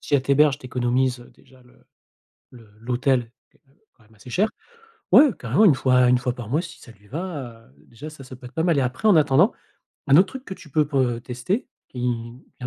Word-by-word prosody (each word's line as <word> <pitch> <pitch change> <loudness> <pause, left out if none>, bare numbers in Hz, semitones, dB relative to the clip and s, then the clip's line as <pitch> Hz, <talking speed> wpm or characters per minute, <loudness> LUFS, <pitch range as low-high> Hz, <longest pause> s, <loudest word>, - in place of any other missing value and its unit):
si 145 - -3
elle 135 - +3
t'héberges, 140 +1 +3
tu 130 - -11
économises, 125 0 -1
heu, 120 - -16
déjà 130 -1 -23
le 125 - -25 0.7
le 115 -4 -16
l'hôtel 125 0 -1 0.2
qui - - -32
est - - -45
quand, 135 - -32
heu, 220 - -37
quand 115 - -27
même 110 0 -25
assez 105 +4 -14
cher. 205 - +1 0.6
Ouais, 300 - +7
carrément. 130 - +2
1 160 - +6
fois 125 -1 +3
1 125 - +4
fois 125 0 -2
par 120 -3 -9
mois 155 +6 +1
si 170 - -11
ça 120 - -14
lui 105 -1 -23
va, 140 - -7
heu. 65 - -26
Déjà, 140 +7 -10
ça 150 -3 -13
ça 130 0 -11
peut 125 0 -15
être 125 - -17
pas 160 - -1
mal 170 -4 +2
et - - +2
après 130 +12 -1
en 200 - +6
attendant, 155 - +4 0.5
un 140 +1 +5
autre 190 +3 +6
truc 265 +3 -9
que 190 - -7
tu 155 - -15
peux 150 +1 +1
pour 135 -3 +1 0.2
tester, 125 - -3 0.2
tu 125 - -11
viens 120 +1 -5
130 Hz, 245 wpm, -23 LUFS, 125-155 Hz, 0.7 s, Ouais